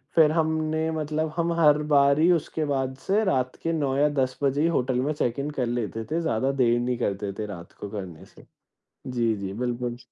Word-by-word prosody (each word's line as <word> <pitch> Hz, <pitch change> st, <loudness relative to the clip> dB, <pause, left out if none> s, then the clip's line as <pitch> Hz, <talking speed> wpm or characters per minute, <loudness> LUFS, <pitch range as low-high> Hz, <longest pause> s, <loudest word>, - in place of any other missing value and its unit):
फिर 155 Hz, -2 st, +6 dB
हमने 160 Hz, 0 st, 0 dB
मतलब 155 Hz, 0 st, -2 dB
हम 170 Hz, 0 st, 0 dB
हर 150 Hz, -2 st, +6 dB, 0.2 s
बार 140 Hz, 0 st, +5 dB
ही 170 Hz, +3 st, +5 dB
उसके 160 Hz, -2 st, 0 dB
बाद 135 Hz, -2 st, -1 dB
से 205 Hz, +3 st, +3 dB
रात 130 Hz, -9 st, 0 dB
के 165 Hz, -, 0 dB
9 140 Hz, -4 st, 0 dB
या 145 Hz, +1 st, +4 dB
10 130 Hz, 0 st, -4 dB
बजे 140 Hz, +1 st, +2 dB
ही 165 Hz, -, +3 dB
होटल 130 Hz, -6 st, +1 dB
में 145 Hz, +4 st, 0 dB
चैक 125 Hz, -4 st, -1 dB
इन 140 Hz, +2 st, -2 dB
कर 125 Hz, -, +2 dB
लेते 115 Hz, -2 st, -3 dB
थे। 165 Hz, +2 st, 0 dB
ज़्यादा 135 Hz, -4 st, 0 dB
देर 120 Hz, -3 st, +2 dB
नहीं 125 Hz, 0 st, -1 dB
करते 100 Hz, -3 st, -2 dB
थे 110 Hz, -, -2 dB
रात 85 Hz, -5 st, -9 dB
को 100 Hz, -, -8 dB
करने 95 Hz, -6 st, -7 dB
से। -, -, -18 dB, 0.6 s
जी, 120 Hz, -3 st, 0 dB
जी, 100 Hz, -1 st, -5 dB
बिल्कुल। 120 Hz, +1 st, -3 dB
135 Hz, 215 wpm, -25 LUFS, 120-155 Hz, 0.6 s, फिर